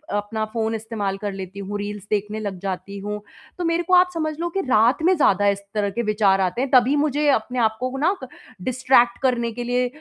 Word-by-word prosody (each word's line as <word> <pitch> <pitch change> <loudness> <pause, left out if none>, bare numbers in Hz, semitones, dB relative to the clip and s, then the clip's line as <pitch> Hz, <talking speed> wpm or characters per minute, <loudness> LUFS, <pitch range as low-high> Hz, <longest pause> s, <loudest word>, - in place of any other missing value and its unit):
अपना 205 +1 -2
फ़ोन 225 -1 -1
इस्तेमाल 210 -3 -3
कर 205 0 -4
लेती 190 0 -7
हूँ। 200 +1 -4
रील्स 205 -1 -5
देखने 210 +1 -1
लग 200 -4 -5
जाती 200 +1 -5
हूँ। 210 +1 -4 0.4
तो 355 - -3
मेरे 335 +1 +1
को 365 - -2
आप 360 0 +6
समझ 310 -2 -2
लो 345 0 -1
कि 390 +3 -2
रात 235 +6 +4
में 370 +2 +5
ज़्यादा 205 - +3
इस 200 0 +2
तरह 205 -1 0
के 215 -3 0 0.3
आते 210 +8 -3
हैं 270 - -1
तभी 255 +3 +5
मुझे 295 0 +1
अपने 250 0 0
आपको 240 +4 0
ना 340 +8 +2
क - - -6 0.3
डिस्ट्रैक्ट 255 0 +3
करने 240 -3 +1
के 240 +2 -5
लिए 245 +1 +1
230 Hz, 215 wpm, -22 LUFS, 205-265 Hz, 0.4 s, आप